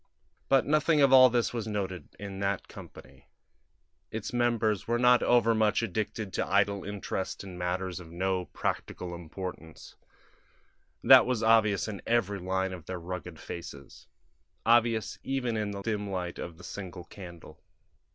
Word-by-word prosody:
But 135 -1 +4
nothing 155 +1 +3
of 135 -2 +5
all 130 -1 +9
this 120 0 0
was 115 -3 -3
noted 95 -4 -4
in 100 -1 -7
that 100 -1 -1
company; - - -13 0.8
its 110 +2 -5
members 115 -5 +1
were 120 +1 +1
not 125 0 +5
overmuch 115 -2 +3
addicted 105 -1 -3
to - - -1
idle 100 0 +2
interest 100 -1 -4
in 95 -2 -9
matters 90 +1 -3
of 85 -2 -11
no 90 +1 -1
practical 90 0 -4
importance; 85 -1 -8 1.1
that - - +8
was 125 -3 0
obvious 110 -3 +4
in 105 -3 -6
every 105 -4 +1
line 95 +1 -1
of 90 -4 -10
their 95 -1 -4
rugged 90 -2 -7
faces 70 -5 -9 0.6
obvious 115 -1 +2
even 130 -4 -2
in 105 -1 -1
the 100 -1 -6
dim 105 -2 -2
light 90 -2 -4
of 85 -2 -7
the 90 - -14
single 90 -1 -7
candle. 85 -3 -12
100 Hz, 150 wpm, -29 LUFS, 90-115 Hz, 1.1 s, all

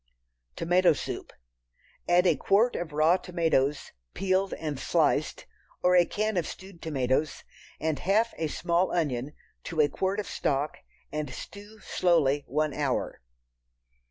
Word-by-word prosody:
Tomato 175 +1 +3
Soup. - - -6 0.8
Add 175 +1 +5
a 170 -4 +4
quart 205 - +2
of 175 -2 -4
raw 155 +4 +4
tomatoes, 165 -6 0 0.2
peeled 190 0 +1
and 150 -4 -4
sliced, - - +1 0.4
or 180 0 +5
a 175 -1 +6
can 215 -1 -1
of 170 - 0
stewed 190 -2 -10
tomatoes, 140 -1 -1 0.4
and 155 -3 -1
half 215 +7 +2
a 160 - 0
small 175 +4 0
onion 145 -4 -1 0.3
to 165 - -4
a 145 -1 +5
quart 190 +5 -1
of 210 - -2
stock, 145 -2 -1 0.3
and 150 -2 -3
stew 205 +11 -10
slowly 145 -5 +2
one 150 +2 0
hour. 140 - -2
165 Hz, 135 wpm, -28 LUFS, 145-185 Hz, 0.8 s, a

